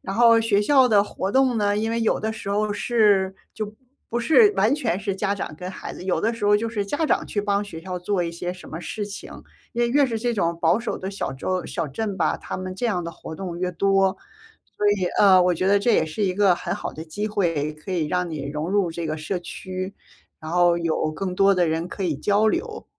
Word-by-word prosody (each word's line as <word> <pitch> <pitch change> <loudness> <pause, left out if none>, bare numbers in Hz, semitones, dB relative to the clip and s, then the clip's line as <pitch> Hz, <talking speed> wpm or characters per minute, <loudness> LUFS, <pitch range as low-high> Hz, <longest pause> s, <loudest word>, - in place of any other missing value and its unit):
然 195 - -5
后 230 -1 +6
学 210 -3 +2
校 265 +2 +5
的 205 -3 +4
活 195 -1 -4
动 260 -2 +3
呢， 205 -1 +1
因 220 +2 -1
为 230 - -1
有 225 - +2
的 220 0 -2
时 220 -2 -8
候 210 +1 0
是 205 -4 +2 0.2
就 215 -1 -5 0.3
不 240 - -1
是 405 - +5
完 235 +6 +3
全 195 - -1
是 200 -1 -2
家 200 +1 -1
长 180 - -5
跟 180 +1 -6
孩 190 - -7
子。 - - -9
有 185 - 0
的 225 - +1
时 230 -2 -5
候 205 0 +6
就 225 +2 -2
是 210 -3 -2
家 290 +10 -1
长 - - +1
去 205 - -2
帮 200 0 +1
学 165 -5 -9
校 180 +1 -5
做 180 0 -1
一 170 - -4
些 175 +1 -4
什 185 - -12
么 160 - -6
事 210 +3 -4
情， 205 - -8 0.4
因 240 - 0
为 240 - +2
越 285 +2 +4
是 225 -2 -2
这 240 +1 0
种 170 -4 0
保 170 +5 +3
守 240 - -3
的 190 +1 -5
小 200 - -3
州 185 +7 -2
小 165 -3 -3
镇 200 +7 -3
吧， - - +1
他 - - -6
们 185 0 -5
这 240 +5 -2
样 180 -6 -1
的 170 - -4
活 160 - -9
动 180 -3 -5
越 180 - 0
多。 195 +1 +2 0.6
所 210 - +2
以， 190 -3 0
呃， 190 -3 +7
我 180 0 +3
觉 185 +3 -2
得 205 - +5
这 235 +3 +2
也 160 - +3
是 160 +7 -5
一 185 - +1
个 200 -3 +4
很 - - -3
好 - - -5
的 160 - -7
机 205 +7 -4
会， 165 -8 -1
可 155 +5 -9
以 170 -4 0
让 180 +1 -1
你 145 -3 -5
融 150 +3 -3
入 195 -4 +1
这 170 0 -4
个 155 0 -2
社 160 +5 -3
区， 185 +2 -6 0.5
然 155 - -8
后 175 0 +4
有 165 -2 -1
更 185 +3 -4
多 195 +1 +5
的 175 -3 +2
人 165 +2 -1
可 195 - -5
以 160 -5 0
交 205 +7 +2
流。 - - -2
195 Hz, 275 characters per minute, -23 LUFS, 175-215 Hz, 0.6 s, 呃